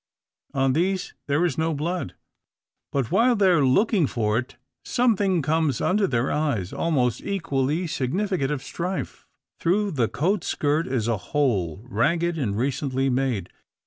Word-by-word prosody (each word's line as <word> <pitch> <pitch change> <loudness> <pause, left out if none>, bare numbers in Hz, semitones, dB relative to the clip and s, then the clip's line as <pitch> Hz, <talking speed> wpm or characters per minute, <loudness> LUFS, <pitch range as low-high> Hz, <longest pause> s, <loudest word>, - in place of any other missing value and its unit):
On 135 -1 +2
these 185 +5 0
there 145 +5 +2
is 160 -4 -1
no 160 0 0
blood; 165 - -3 0.8
but 135 -5 -1
while 245 +1 +4
they 200 -3 +4
are 170 -5 +4
looking 175 - +3
for 110 -2 0
it, 125 - -7 0.3
something 200 - +2
comes 155 -3 +1
under 200 +1 +2
their 120 -4 0
eyes, 130 - -1
almost 130 -8 0
equally 160 -4 -1
significant 170 +2 -1
of 145 -3 -3
strife. 180 +2 -5 0.3
Through 200 +4 +1
the 125 -7 +1
coat 185 - 0
skirt 150 +3 0
is 125 -4 -1
a 115 -2 +1
hole, 100 - -1
ragged, 165 +9 +1
and 110 -10 -2
recently 135 +1 0
made. 125 -8 -1
145 Hz, 145 wpm, -24 LUFS, 130-175 Hz, 0.8 s, while